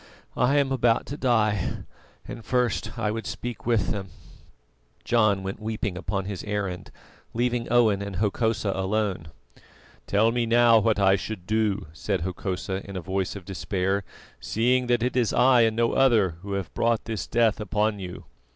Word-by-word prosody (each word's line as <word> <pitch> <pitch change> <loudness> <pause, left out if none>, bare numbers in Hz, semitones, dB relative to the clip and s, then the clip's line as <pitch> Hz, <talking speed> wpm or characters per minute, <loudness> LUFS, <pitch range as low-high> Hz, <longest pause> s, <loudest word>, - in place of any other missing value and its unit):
I 130 +4 +3
am 140 -2 +2
about 120 -3 +2
to 140 - -6
die, 110 - 0 0.4
and 115 - -8
first 120 -3 -1
I 110 -2 0
would 110 +1 -4
speak 120 -1 -6
with 115 -5 +2
them." 95 -2 -4 1.0
John 110 -5 +2
went 95 +1 -5
weeping 110 -3 -3
upon 95 +1 -3
his 100 -2 -5
errand, 100 -4 -3 0.5
leaving 120 0 -1
Owen 110 -5 +4
and 100 -1 -5
Hokosa 110 +1 0
alone. 95 -3 -1 0.8
"Tell 110 +3 +3
me 120 -1 0
now 115 0 +6
what 110 0 +2
shall 100 - +2
I 95 +3 +2
do?" 105 -1 0
said 90 +4 -2
Hokosa 95 +1 -3
in 100 - -7
a - - -3
voice 95 +2 -2
of 95 -3 -9
despair, 95 +1 -1 0.4
"seeing 125 +3 +1
that 120 -1 +2
it 125 - -1
is 120 -4 +1
I 125 0 +5
and 110 -1 +3
no 115 0 +2
other 115 -9 +4
who 100 +1 -5
have 100 -2 -4
brought 115 -1 +1
this 110 -2 -4
death 115 -2 +2
upon 105 0 0
you." 90 -2 -7
110 Hz, 170 wpm, -25 LUFS, 100-115 Hz, 1.0 s, now